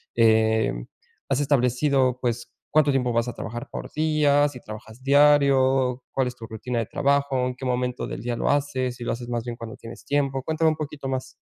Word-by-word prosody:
eh, 110 -1 +3 0.6
¿has 135 0 +1
establecido, 130 -1 +2
pues, 120 -1 -3 0.2
cuánto 150 -2 +4
tiempo 125 -2 +1
vas 115 +1 +1
a - - -5
trabajar 120 +2 -6
por - - -6
día? 150 -2 +3
¿Si 125 -3 -10
trabajas 110 +3 -10
diario? 135 -3 +4
¿Cuál 130 -2 0
es 125 - -5
tu 115 - -9
rutina 120 +2 -3
de 115 - -1
trabajo? 140 -2 +1
¿En 125 - -4
qué 130 - -7
momento 125 0 -1
del - - -6
día 120 0 -2
lo - - 0
haces? 130 -4 0
¿Si 120 - -7
lo - - 0
haces 120 0 -7
más 120 -1 -2
bien 120 -1 -4
cuando 115 -1 -8
tienes 115 - -11
tiempo? 135 -2 0
Cuéntame 160 +1 +2
un - - -2
poquito 150 -2 -5
más. 130 0 -4
130 Hz, 205 wpm, -24 LUFS, 120-140 Hz, 0.6 s, cuánto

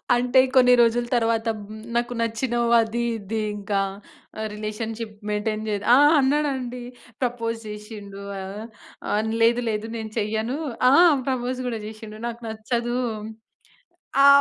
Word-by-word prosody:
అంటే, 250 +2 +3 0.2
కొన్ని 250 -1 +7
రోజుల 235 +1 +3
తర్వాత, 230 -1 +1
హ్మ్, 215 +1 -10
నాకు 240 +1 0
నచ్చినవు, 235 +1 0
అదీ, 230 +1 -2 0.2
ఇదీ, 215 +3 -3 0.2
ఇంకా 200 0 -1 0.6
ఆహ్, 220 - -2
రిలేషన్షిప్ 215 +1 -5
మెయింటైన్ 215 +1 -1
చేద్ 205 -1 -2
ఆ! - - +6 0.2
అన్నాడండి. 265 -3 0 0.4
ప్రపోజ్ 230 -2 -1
జేషిండు. 210 -1 -8 0.2
ఆహ్, 195 +3 -6 0.5
ఆ! - - -1 0.3
లేదు 235 +2 +3
లేదు, 215 +1 -2
నేను 220 -1 -6
చెయ్యను. 220 +5 -1 0.3
ఆ! - - +5 0.4
ప్రపోజ్ 255 0 -2
గూడా 230 -2 -2
జేషిండు. 215 0 -9
నాకు 235 0 -6
నచ్చదూ. 235 +2 -2 1.3
ఆ! - - +9
225 Hz, 130 wpm, -24 LUFS, 215-240 Hz, 1.3 s, ఆ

